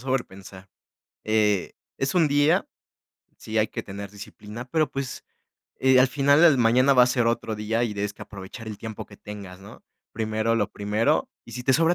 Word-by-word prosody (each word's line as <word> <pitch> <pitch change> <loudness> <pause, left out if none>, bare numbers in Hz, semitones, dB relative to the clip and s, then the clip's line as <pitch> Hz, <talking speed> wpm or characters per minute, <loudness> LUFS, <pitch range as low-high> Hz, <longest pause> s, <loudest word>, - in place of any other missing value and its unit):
sobrepensar, 100 -7 -5 0.6
eh, 105 -3 +1 0.3
es 135 0 -1
un 170 -3 +4
día. 145 +2 +3 0.7
Sí 110 0 -5
hay 110 0 +3
que - - -5
tener 100 +1 -7
disciplina, 105 +2 -9
pero 155 +4 0
pues, 135 -2 -5 0.5
eh, 130 -1 +5
al 130 - +5
final 140 +3 +3
al 160 -5 +6
mañana 125 +4 +4
va 125 - +7
a - - +5
ser 120 -1 +1
otro 115 -1 -1
día 110 +2 -1
y 115 - -2
tienes 105 0 -2
que - - -11
aprovechar 100 +3 -10
el 105 -2 -6
tiempo 110 -2 -7
que 100 - -15
tengas 100 -3 -9
¿no? 100 +3 -14 0.3
Primero 110 +1 -1
lo 105 -2 -1
primero. 105 +2 0 0.2
Y - - -12
si 125 - -5
te 130 - +3
sobra 165 +3 +3
115 Hz, 190 wpm, -25 LUFS, 105-130 Hz, 0.7 s, va